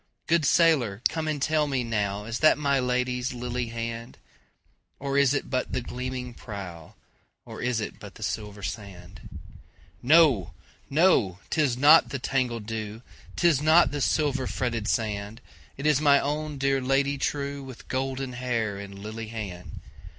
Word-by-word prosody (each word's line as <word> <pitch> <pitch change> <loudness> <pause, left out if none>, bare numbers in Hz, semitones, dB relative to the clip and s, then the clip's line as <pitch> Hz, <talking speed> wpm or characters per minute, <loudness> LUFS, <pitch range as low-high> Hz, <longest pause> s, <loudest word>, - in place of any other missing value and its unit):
Good 165 -2 +2
sailor 130 - +3
come 160 -1 -3
and 155 -2 -1
tell 155 +2 +1
me 135 -3 -1
nowIs 105 0 -2
that 155 - +5
my 140 -2 +1
Lady's 125 0 -1
lily 120 0 -3
hand? 115 0 -5 0.8
Or 140 0 -3
is 140 -2 +4
it - - -2
but 130 -1 -2
the 130 - 0
gleaming 125 0 -5
prow, 95 -8 -9 0.5
Or - - -8
is 125 -2 0
it 105 - -5
but - - -11
the - - -9
silver 105 -1 -4
sand? 95 -3 -8 0.7
No! 140 - +4 0.3
no! 135 - +3
'tis 140 -6 +1
not 150 +5 +7
the 135 - -3
tangled 125 -4 -1
dew,'Tis 115 +8 -2
not 160 +3 +5
the 145 0 -3
silver 140 -3 +1
fretted 120 -4 -2
sand, 105 -1 -2 0.4
It 140 - -6
is 150 -2 +3
my 140 -2 +6
own 150 +1 -3
dear 135 0 +1
Lady 135 +2 +1
trueWith 140 -3 -4
golden 130 0 -3
hair 115 -5 -2
and 100 -1 -9
lily 110 +2 -6
hand! 100 -6 -7
125 Hz, 150 wpm, -26 LUFS, 110-140 Hz, 0.8 s, not